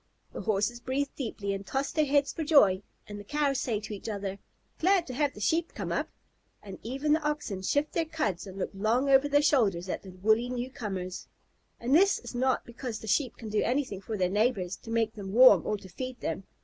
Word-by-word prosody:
The - - -5
Horses 215 +2 0
breathe 270 +3 -1
deeply 210 -6 -3
and 195 0 -4
toss 270 +7 -2
their 310 -1 +1
heads 285 0 +2
for 325 - -3
joy, 210 - +5 0.3
the 205 0 -7
Cows 285 +3 0
say 225 -4 -1
to 215 0 -6
each 205 +2 -6
other, 200 -2 -4 0.4
"Glad 370 0 +3
to 255 - -7
have 285 +2 0
the - - -9
Sheep 325 - 0
come - - -4
up," - - -1 0.5
and 195 -2 -9
even 275 +6 0
the 320 - +2
Oxen 295 -10 -2
shift 285 +10 0
their 330 - +1
cuds 300 - -2
and 190 0 -9
look 195 - -3
long 230 +8 +1
over 270 +2 +5
their 290 +1 +4
shoulders 200 - +2
at - - -3
the 195 - -11
woolly 215 +6 +1
newcomers. 215 -8 -5 0.5
And 245 +3 -1
this 390 +6 +5
is - - -9
not 255 +1 +1
because 235 -1 -6
the 220 - -10
Sheep 235 +4 +1
can 225 - -7
do 210 0 +1
anything 245 -6 -1
for 215 +1 -4
their 185 -2 +2
neighbors 200 -2 0
to 225 - -13
make 225 -1 +1
them 200 -3 -7
warm 230 -7 +7
or 210 - 0
to 195 -1 -13
feed 255 +7 -6
them. 165 +4 -4
235 Hz, 220 wpm, -29 LUFS, 200-280 Hz, 0.5 s, warm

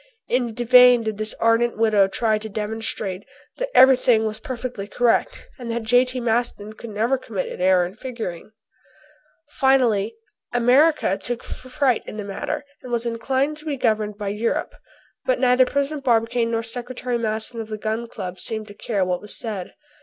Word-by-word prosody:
In 240 -3 0
vain 245 0 +6
did 215 -1 -3
this 215 0 -3
ardent 230 +1 +2
widow 215 -3 +4
try 215 +2 0
to 220 +1 -7
demonstrate 215 -2 -3 0.3
that - - -2
everything 250 -4 +6
was 215 0 -3
perfectly 240 -4 -5
correct, 240 +2 0
and 240 -2 -6
that 230 0 -2
J.T. 250 +3 +2
Maston 225 -2 -1
could 230 +1 -10
never 230 +5 0
commit 210 -7 -4
an - - -7
error 185 -1 +4
in 180 - -7
figuring. 220 -7 -6 1.0
Finally 235 -7 +2 0.4
America 245 - +3
took 245 0 -4
fright 255 -1 -1
in - - -7
the 210 - -5
matter 285 +9 -4 0.2
and 250 - -9
was 235 0 -1
inclined 265 +5 -1
to 305 - -15
be 290 -3 -2
governed 215 -4 0
by 205 -2 -3
Europe. 210 +3 -2 0.5
But - - +1
neither 250 0 +4
President 280 +1 -1
Barbicane 230 -1 +2
nor 230 0 -1
Secretary 245 +1 -3
Maston 220 +1 -2
of 220 - -9
the 215 - -4
Gun 220 +2 -3
Club 185 -5 -7
seemed 220 -2 -2
to - - -10
care 205 -2 -1
what 180 -1 -2
was 210 - -4
said. 210 -6 -5
230 Hz, 170 wpm, -22 LUFS, 215-250 Hz, 1.0 s, vain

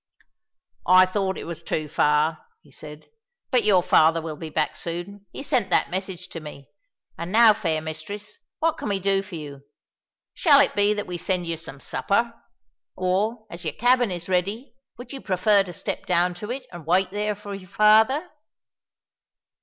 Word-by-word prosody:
"I 185 0 +7
thought 190 0 -2
it - - -6
was 170 -1 -7
too 155 -2 -3
far," 150 +1 +1 0.2
he 145 - -21
said, 150 +2 -11 0.5
"but 250 -4 +3
your 195 -4 +4
father 165 +1 +4
will 160 -1 -6
be 160 +1 -7
back 155 0 -1
soon; 185 +4 -6
he - - -7
sent 255 -8 0
that - - +2
message 185 -1 -4
to 165 - -7
me. 150 -3 -11 0.5
And 170 +2 -5
now, 225 0 +7
fair 165 -8 -1
mistress, 160 +7 -7 0.2
what 325 0 0
can - - -4
we 200 -1 0
do 195 +1 +1
for 195 -2 -10
you? 145 -3 -8 0.7
Shall 290 -5 +5
it 280 - +3
be 205 +1 +3
that 205 - -3
we 175 -1 -5
send 180 0 -1
you 170 0 -2
some 155 -4 -9
supper? 230 - -1 0.6
Or, 205 +5 -1
as 170 +1 -7
your 155 -3 -3
cabin 245 -1 +3
is 175 -1 -6
ready, 200 +8 -1 0.2
would 245 +3 -9
you 270 - -7
prefer 200 +2 +3
to 190 -2 -5
step 170 - -5
down 180 0 +2
to 210 +5 -8
it 255 +1 -5
and 170 -3 -11
wait 185 +2 +2
there 210 +1 -1
for 205 0 -9
your 190 -2 -9
father?" 220 - +4
185 Hz, 185 wpm, -24 LUFS, 165-210 Hz, 0.7 s, I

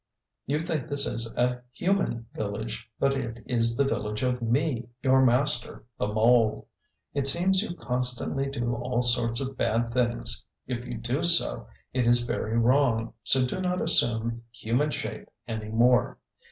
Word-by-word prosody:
You 145 +3 0
think 160 -4 -3
this 145 -1 0
is 115 +1 -3
a 125 0 0
human 175 -8 -1
village; 100 - -5
but 140 0 +2
it 120 -4 -5
is 115 -1 +1
the 140 - +4
village 105 -4 -2
of 125 -1 0
me, 120 0 0
your 130 0 +5
master 125 -1 +4
the - - 0
mole. 110 +1 +2 0.5
It 140 -1 -1
seems 185 +6 +4
you 175 -5 -4
constantly 125 +1 -1
do 120 -3 -2
all 125 +1 -1
sorts 120 0 0
of 135 0 -4
bad 115 +1 0
things. 120 -1 -1 0.2
If 120 -1 -4
you 120 -1 -5
do 120 +6 -2
so, 170 0 +3 0.3
it 125 -2 +1
is 120 0 +4
very 115 -1 -2
wrong; 115 -2 +2
so 130 +1 +3
do 155 +9 -3
not 180 0 -1
assume 115 0 +1
human 120 +6 0
shape - - -5 0.2
any 110 -1 -5
more. 120 +3 +3
120 Hz, 160 wpm, -27 LUFS, 115-135 Hz, 0.5 s, your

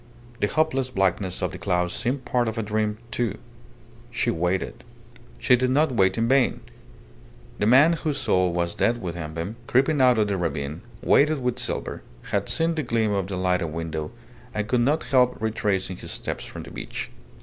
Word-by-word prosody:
The 105 - +2
hopeless 135 -2 +1
blackness 95 -4 0
of - - 0
the - - -8
clouds 90 0 0
seemed 130 +3 -2
part 120 -2 +1
of 110 +1 -3
a 115 - 0
dream, 105 0 -1
too. 115 -4 -1 0.7
She 120 0 0
waited. 90 -1 -2 0.5
She 125 - +4
did 125 +1 +1
not 145 +3 +3
wait 95 -5 +2
in 115 0 +1
vain. 130 0 +3 1.0
The 105 - +2
man 140 +8 +6
whose 155 -3 -2
soul 95 -8 +2
was 85 0 -1
dead 120 +1 +1
within 85 -5 -5
him, 90 +7 -4
creeping 135 +3 +3
out 125 -2 +5
of 105 -1 +2
the 100 -1 -1
ravine, 80 -2 -3 0.2
weighted 150 +3 +4
with 125 -1 -1
silver, - - -3 0.3
had - - 0
seen 165 +1 +2
the 160 - -1
gleam 115 -5 0
of 100 -2 0
the 95 -1 -4
lighted 90 -2 +1
window, 80 -1 -4 0.5
and 105 0 -1
could 120 +1 +2
not 145 +6 +2
help 125 -2 +2
retracing 100 -4 -1
his - - -8
steps - - -4
from - - -8
the - - -11
beach. - - -6
110 Hz, 185 wpm, -25 LUFS, 90-130 Hz, 1.0 s, man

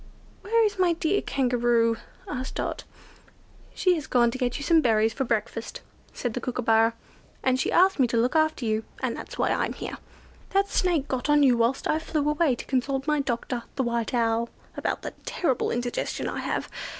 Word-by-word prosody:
"Where 455 +2 +3
is 415 -2 -2
my 360 -2 +4
dear 335 +4 0
Kangaroo?" 240 -3 +2 0.3
asked 260 -8 -5
Dot. - - -3 0.9
"She 365 - +3
has 310 -5 -3
gone 240 -2 +3
to 260 - -6
get 245 -2 0
you 285 - -5
some 325 +2 +4
berries 225 -3 +3
for 265 - -2
breakfast," 230 0 -3 0.3
said 245 -3 -3
the 250 - -3
Kookooburra, 225 -2 +2 0.5
"and 260 0 +2
she - - 0
asked 375 -1 +4
me 255 - +5
to 235 - -1
look 245 +6 +1
after 315 -5 +2
you, 220 0 0 0.2
and - - 0
that's - - -8
why - - +1
I'm - - 0
here. - - -6 0.6
That 395 0 +4
Snake 335 -6 +1
got 260 +2 -2
on 295 0 +5
you 255 -3 +5
whilst 235 +3 +1
I 310 - +1
flew 305 -2 -1
away 300 -3 +2
to - - -8
consult 270 +1 -1
my 300 -1 +1
doctor, 245 -2 -2
the 265 - 0
White 235 0 -1
Owl, 230 0 +1 0.3
about - - -2
the - - -5
terrible 265 -9 0
indigestion 245 0 -2
I - - -3
have. - - -2
255 Hz, 195 wpm, -26 LUFS, 235-305 Hz, 0.9 s, me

